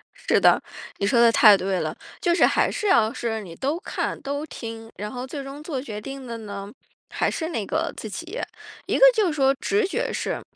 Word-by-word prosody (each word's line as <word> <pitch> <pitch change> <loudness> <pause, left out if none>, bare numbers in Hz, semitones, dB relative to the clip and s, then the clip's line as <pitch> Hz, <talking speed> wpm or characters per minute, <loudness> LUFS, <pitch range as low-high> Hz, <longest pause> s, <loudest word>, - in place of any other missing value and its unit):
是 - - +1
的， - - +5 0.4
你 200 - -1
说 235 0 +3
的 230 -1 +7
太 215 -3 +8
对 190 0 -1
了。 - - -3 0.2
就 345 -3 +2
是 - - +5
还 - - +2
是 420 - -2
要 225 - +4
是 225 -2 -3
你 170 -5 -10
都 285 - -2
看、 - - -3
都 285 +2 -3
听， 225 -4 -8
然 210 +1 -5
后 250 0 -5
最 275 +1 -6
终 275 +2 -8
做 285 -5 -3
决 210 -6 -6
定 275 +3 -7
的 230 -1 -5
呢， 200 -1 -7 0.4
还 - - 0
是 320 0 -3
那 225 - -3
个 320 +7 -1
自 220 - -7
己。 340 - -6 0.5
一 - - +1
个 - - +4
就 430 -4 +3
是 325 - -1
说 270 -2 +3
直 415 -1 +2
觉 480 +5 -2
是， - - -3
265 Hz, 240 characters per minute, -24 LUFS, 220-320 Hz, 0.5 s, 太